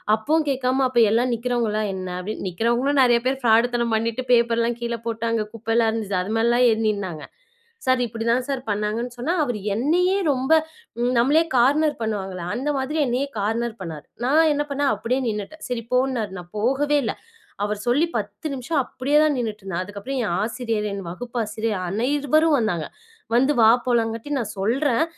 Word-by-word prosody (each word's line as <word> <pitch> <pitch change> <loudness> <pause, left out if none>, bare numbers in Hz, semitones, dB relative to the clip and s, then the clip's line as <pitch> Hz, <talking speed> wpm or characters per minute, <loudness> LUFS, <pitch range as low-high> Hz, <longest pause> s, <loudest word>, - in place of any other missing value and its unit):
அப்பவும் 305 +8 0
கேக்காம, 260 0 +1
"அப்ப, 245 -2 +1
எல்லா 235 +2 +3
நிக்கிறவங்கல்லாம் 230 -3 -1
என்ன?" 185 -1 -5
அப்படின்னு. 195 +2 -5
நிக்கிறவங்களும் 240 +8 +1
நெறைய 240 -1 +4
பேர் 265 +1 0
ஃபிராடுத்தனம் 235 0 +3
பண்ணிட்டு, 230 +3 -1
பேப்பர்ல்லாம் 235 0 +2
கீழ 235 0 -2
போட்டு 230 0 -3
அங்க 220 -2 0
குப்பெல்லாம் 225 0 +1
இருந்துச்சு, 210 -4 -2
அது 195 - -4
மேலெல்லாம் 235 +2 +3
ஏறி 225 0 +1
நின்னாங்க. 185 -8 -4 0.6
சார்! 255 -1 +3
இப்படித்தான் 230 +2 -1
சார் 270 -2 -1
பண்ணாங்கன்னு 215 +4 -2
சொன்னா, 280 +9 -1
அவர் 245 -6 -2 0.2
என்னையே 345 - +2 0.2
ரொம்ப 260 +3 -2 0.7
நம்மளையே 290 +7 +4
கார்னர் 295 +5 +4
பண்ணுவாங்கள, 195 -4 -3 0.2
அந்த 270 +4 -2
மாதிரி 280 +4 -2
என்னையே 255 +4 0
கார்னர் 225 +3 -1
பண்ணாரு. 160 -5 -7 0.2
நான் 310 +4 +4
என்ன 295 0 0
பண்ணேன், 280 0 +1
அப்படியே 250 +3 -1
நின்னுட்டேன். 210 +9 -5
சரி 235 -2 -2
போ 250 - +4
இன்னாரு. 225 -6 -3
நான் 175 0 -12
போகவே 280 +6 +2
இல்ல. 225 - -1 0.5
அவர் 210 0 -1
சொல்லி 280 +7 +3
10 205 +7 -5
நிம்ஷம் 275 +4 -1
அப்படியேதான் 295 +4 +2
நின்னுட்டிருந்தேன். 205 -6 -3
அதுக்கப்புறம் 205 +7 -5
என் 170 - -1
ஆசிரியர், 225 -1 -2
என் 200 0 -4
வகுப்பு 240 +7 -7
ஆசிரியர், 215 -1 -2
அனைவரும் 285 - +2
வந்தாங்க. 180 -9 -1 0.5
வந்து 265 +4 +4
வா 220 - +7 0.2
போலாம்ங்காட்டி, 230 +1 0
நான் 220 -4 -3
சொல்றேன், 250 +7 +1
235 Hz, 160 wpm, -23 LUFS, 215-265 Hz, 0.7 s, வா